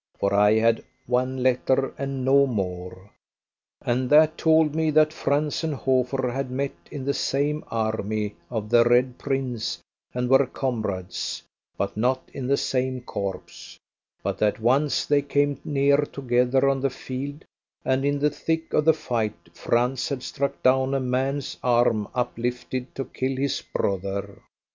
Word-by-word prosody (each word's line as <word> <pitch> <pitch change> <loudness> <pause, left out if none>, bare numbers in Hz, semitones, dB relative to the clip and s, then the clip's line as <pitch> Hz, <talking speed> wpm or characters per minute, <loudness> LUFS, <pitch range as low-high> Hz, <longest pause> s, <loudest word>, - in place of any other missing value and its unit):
For 100 0 +1
I 105 +1 +5
had 115 0 +2 0.2
one 130 +1 0
letter 130 +1 +2
and 135 -1 -3
no 140 +1 +5
more; 95 -3 -4 0.7
and 125 +1 0
that 155 +1 +6
told 160 -2 +3
me 160 0 +1
that 155 0 +4
Franz 150 +1 0
and 160 -2 -1
Hofer 130 -1 0
had 135 +1 -3
met 135 +2 -2 0.2
in 140 -3 -6
the 140 - +1
same 145 +3 0
army 110 -2 -2
of 110 -2 -4
the 120 -1 +7
Red 125 +1 +2
Prince 125 -10 -2 0.3
and 125 0 -2
were 135 +1 +5
comrades, 110 -9 -3 0.3
but 100 0 -2
not 125 +4 0
in 130 -2 -4
the 140 +1 +3
same 130 -1 -1
corps; 90 -6 -6 0.5
but - - -2
that 105 0 +1
once 135 +6 +2
they 145 -1 +3
came 145 0 0
near 140 -1 +3
together 130 -2 +1
on 135 -1 +1
the 135 - +2
field, 135 +3 -6 0.4
and 130 +1 +1
in 145 0 +1
the 145 +1 +2
thick 160 +2 -2
of 150 - +3
the 160 -1 +5
fight 110 - -3
Franz 125 - 0
had 135 -3 -3
struck 140 0 -3
down 130 +1 +3
a - - +2
man's 130 +2 -1
arm 120 -4 +2
uplifted 125 +1 -3
to 135 - -3
kill 130 +2 -3
his 135 +1 -1
brother. 100 +1 -2
130 Hz, 155 wpm, -25 LUFS, 115-140 Hz, 0.7 s, the